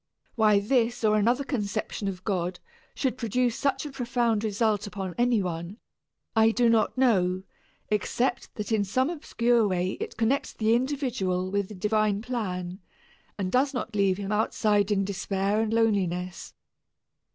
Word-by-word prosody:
Why 215 -2 +4
this 235 +2 +1
or 215 -1 +4
another 235 +6 +2
conception 210 -5 -3
of 185 -1 -5
God 180 -3 -2 0.4
should 260 -2 -1
produce 240 +1 0
such 275 0 -1
a 295 - -6
profound 240 -4 0
result 210 -1 0
upon 190 -2 -5
any 240 -4 +2
one, 170 +3 -5 0.6
I 220 0 +5
do 235 +1 +3
not 225 +2 +2
know, 190 -8 +2 0.5
except 240 +4 -1
that 210 +1 -5
in 215 -2 +2
some 255 - 0
obscure 240 -8 +1
way 185 -1 -1
it - - -6
connects 235 +5 0
the 220 0 +1
individual 235 -9 -1
with 200 -1 0
the 210 - -9
divine 210 +1 +1
plan, 185 -7 -4 0.6
and 190 -3 -2
does 270 +2 +2
not 240 -2 -4
leave 195 -2 +2
him 200 0 -4
outside 210 -1 +2
in 195 -2 +1
despair 200 +1 -1
and 220 -1 -1
loneliness. 185 -6 0
215 Hz, 150 wpm, -27 LUFS, 195-240 Hz, 0.6 s, I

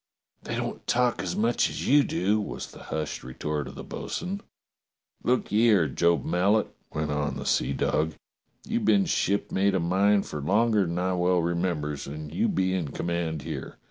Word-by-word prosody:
"They - - -4
don't - - -4
talk 125 -1 +2
as 90 -2 -3
much 115 +3 +2
as - - -4
you 145 +2 +6
do," 105 -1 +1
was 100 - -6
the - - -12
hushed 75 -1 -3
retort 75 +3 -3
of - - -9
the - - -7
bo'sun. 190 +3 -4 0.8
"Look 125 +1 +1
ye 110 +3 +4
'ere, 95 -8 +4
Job 85 +5 +2
Mallet," 100 +5 +2 0.2
went 75 -1 -2
on 75 0 -1
the - - -6
seadog, 75 +3 +1 0.5
"you've 225 +1 -1
been 200 -2 +4
shipmate 100 - +1
o' - - +2
mine 100 +4 +3
fer 75 - -6
longer 105 +4 +3
than 85 +1 -3
I 90 +1 0
well 90 -1 +2
remembers, 85 -4 -1
and 75 +1 -7
you 85 - +2
be 95 0 +1
in 90 -5 -1
command 80 -1 -2
here. - - -6
90 Hz, 175 wpm, -27 LUFS, 80-105 Hz, 0.8 s, you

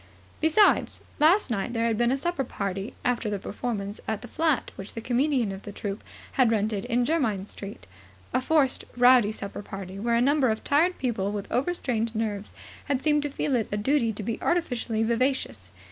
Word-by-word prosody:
Besides, 320 +7 +3 0.2
last 320 - +4
night 215 +2 -1
there 230 -1 +1
had 230 -1 +2
been 240 +2 +2
a 270 - +1
supper 345 0 -1
party 200 -1 -4
after 240 -3 +1
the 205 - -1
performance 205 0 -4
at 220 0 -2
the - - -7
flat 315 -3 0
which 195 - -9
the - - -3
comedian 245 -1 +1
of 195 0 -7
the 205 - -8
troupe 200 +1 -5 0.3
had 255 -3 +3
rented 215 -2 0
in 245 0 +1
Jermyn 235 - 0
Street, 200 0 -9 0.5
a - - +2
forced, 280 -1 +2
rowdy 245 -3 +6
supper 200 -2 -6
party 195 -1 -7
where 235 +2 +1
a - - +4
number 275 +1 +3
of 220 0 -1
tired 335 +6 +3
people 215 -6 -1
with 205 -1 -5
over 270 +8 +1
strained 230 -9 -2
nerves 210 -2 -3 0.3
had 275 -2 -1
seemed 295 -1 +3
to 290 - -2
feel 275 -1 -1
it 225 -4 0
a 205 - 0
duty 235 +1 +2
to 210 0 -6
be 225 +2 -3
artificially 245 -10 0
vivacious. 255 +4 0
235 Hz, 195 wpm, -27 LUFS, 210-275 Hz, 0.5 s, rowdy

